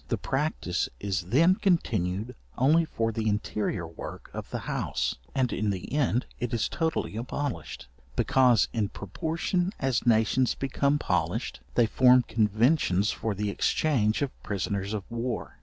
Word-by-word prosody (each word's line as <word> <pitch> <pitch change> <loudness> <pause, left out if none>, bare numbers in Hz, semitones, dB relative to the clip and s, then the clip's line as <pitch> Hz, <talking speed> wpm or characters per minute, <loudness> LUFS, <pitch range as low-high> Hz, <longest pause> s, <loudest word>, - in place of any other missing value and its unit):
The 115 - 0
practice 135 - -1
is 95 -3 -2
then 160 - +5
continued 115 - 0 0.2
only 155 +6 +4
for 115 -7 -1
the 110 0 -1
interior 105 -4 -1
work 80 0 -9
of - - -6
the - - -4
house, - - -1 0.2
and 130 -2 +1
in 105 0 0
the 95 +3 -4
end 130 -4 +1
it 120 -2 -2
is 115 - +1
totally 160 -9 -2
abolished; 130 - -4 0.3
because 125 -5 +4
in 105 -4 0
proportion 165 - -2
as 130 -3 0
nations 115 +3 +3
become 140 +1 +1
polished, - - -1 0.2
they 120 - +5
form 125 +2 +5
conventions 110 - +2
for 110 -3 -3
the 105 +1 -1
exchange 115 0 +1
of 140 - -2
prisoners 100 +1 -2
of 105 - -4
war. 120 +1 -4
115 Hz, 145 wpm, -28 LUFS, 105-140 Hz, 0.3 s, then